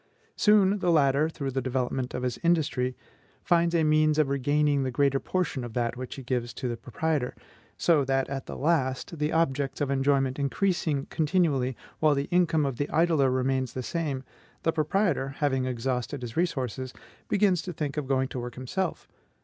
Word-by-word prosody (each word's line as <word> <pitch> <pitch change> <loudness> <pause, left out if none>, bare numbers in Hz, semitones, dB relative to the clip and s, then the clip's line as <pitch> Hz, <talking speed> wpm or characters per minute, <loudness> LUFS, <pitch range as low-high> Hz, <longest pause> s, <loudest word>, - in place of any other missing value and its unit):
Soon 205 -1 +4
the 180 - 0
latter, 150 -1 +3
through 140 -4 -4
the 135 +1 -1
development 130 0 -2
of 125 - -3
his 125 -2 -2
industry, 145 -7 +1 0.5
finds 170 0 +2
a 165 - +3
means 155 0 +3
of 155 -3 +3
regaining 145 +1 +2
the 130 - -1
greater 140 +1 +2
portion 170 -8 -2
of 120 -2 -7
that 120 -1 0
which 130 0 -6
he 135 - -8
gives 120 -1 -2
to 130 - -3
the 120 - -2
proprietor; 125 +4 -2 0.4
so 160 -5 +3
that 135 0 0
at 135 -1 -5
last, 145 0 -1
the 150 +1 0
objects 140 -4 0
of 145 -2 0
enjoyment 135 -1 +1
increasing 150 -1 0
continually, 150 -7 +1 0.2
while 155 -2 +4
the 140 +1 -1
income 165 -4 +3
of 135 -4 -2
the 145 - -2
idler 160 -4 +3
remains 130 0 0
the 130 - -4
same, 145 -4 -2 0.4
the 165 - +3
proprietor, 155 -4 0
having 135 -3 +1
exhausted 125 +2 -2
his 120 -1 -6
resources, 130 - -2 0.3
begins 195 -4 +3
to 180 - -5
think 150 -4 -4
of 150 -3 -3
going 130 -1 +1
to 130 - -5
work 120 0 -6
himself. 160 +8 -3
140 Hz, 180 wpm, -27 LUFS, 130-160 Hz, 0.5 s, Soon